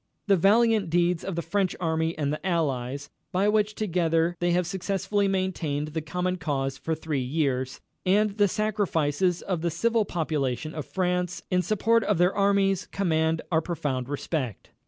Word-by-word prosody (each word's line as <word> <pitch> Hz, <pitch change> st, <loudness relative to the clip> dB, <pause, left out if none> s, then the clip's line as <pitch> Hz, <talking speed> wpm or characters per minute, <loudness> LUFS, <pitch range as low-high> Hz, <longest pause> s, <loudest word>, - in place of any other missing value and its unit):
The 200 Hz, -, +4 dB
valiant 210 Hz, +1 st, +4 dB
deeds 175 Hz, 0 st, +2 dB
of 195 Hz, -, -4 dB
the 170 Hz, -, -2 dB
French 185 Hz, +3 st, 0 dB
Army 160 Hz, -1 st, 0 dB
and 145 Hz, -1 st, 0 dB
the 150 Hz, -, -5 dB
Allies, 140 Hz, -6 st, -1 dB, 0.2 s
by 190 Hz, +3 st, +2 dB
which 210 Hz, 0 st, +2 dB
together 170 Hz, -4 st, +1 dB
they 175 Hz, -, +1 dB
have 175 Hz, +1 st, +2 dB
successfully 195 Hz, +3 st, -1 dB
maintained 175 Hz, -6 st, -1 dB
the 160 Hz, +1 st, -3 dB
common 180 Hz, +4 st, -2 dB
cause 135 Hz, -5 st, -2 dB
for 160 Hz, +4 st, -2 dB
three 155 Hz, -3 st, -2 dB
years, 130 Hz, -1 st, -1 dB, 0.2 s
and 205 Hz, +3 st, +3 dB
the 205 Hz, -, +6 dB
sacrifices 185 Hz, -5 st, 0 dB
of 180 Hz, -4 st, -2 dB
the 170 Hz, -, 0 dB
civil 225 Hz, +7 st, +1 dB
population 155 Hz, -5 st, -2 dB
of 155 Hz, -3 st, -5 dB
France 180 Hz, -1 st, -1 dB
in 180 Hz, 0 st, +3 dB
support 225 Hz, +4 st, +2 dB
of 210 Hz, -, +2 dB
their 180 Hz, +2 st, +3 dB
armies 195 Hz, -1 st, +2 dB
command 160 Hz, -4 st, 0 dB
our 160 Hz, -1 st, +3 dB
profound 140 Hz, -7 st, -3 dB
respect. 145 Hz, -, -3 dB
175 Hz, 165 wpm, -26 LUFS, 155-195 Hz, 0.2 s, the